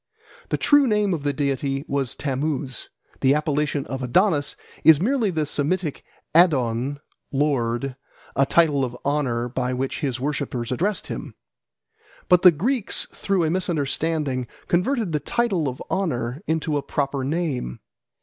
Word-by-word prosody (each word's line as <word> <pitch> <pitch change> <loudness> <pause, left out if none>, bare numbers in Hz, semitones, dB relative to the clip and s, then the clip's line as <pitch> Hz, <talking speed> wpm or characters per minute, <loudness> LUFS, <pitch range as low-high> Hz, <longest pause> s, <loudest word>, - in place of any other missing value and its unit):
The - - +1
true 290 -2 +5
name 210 -3 +2
of 160 - -2
the 145 0 0
deity 140 0 -1
was 135 -4 -1
Tammuz: 140 -1 -3 0.3
the 135 +1 +4
appellation 150 -1 0
of 130 +3 -5
Adonis 145 - +2 0.3
is 160 -3 +8
merely 230 +2 +1
the 160 -4 0
Semitic 150 +2 -1 0.3
Adon, 140 -5 +3 0.3
"lord," 135 -3 0 0.4
a 135 0 +3
title 150 -5 +3
of 125 -1 -3
honour 130 -5 0
by 125 0 -2
which 130 +1 -2
his 130 -4 -2
worshippers 135 -4 -2
addressed 190 +10 0
him. - - -6 0.9
But 180 -1 +6
the 185 - +10
Greeks 210 - -1
through 195 -3 0
a 160 - +1
misunderstanding 155 -6 -1 0.2
converted 200 +3 +1
the 150 - +1
title 195 -6 0
of 130 +2 -7
honour 140 -8 -1
into 160 -1 0
a - - -1
proper 140 -1 -2
name. 140 - -2
145 Hz, 140 wpm, -23 LUFS, 130-170 Hz, 0.9 s, the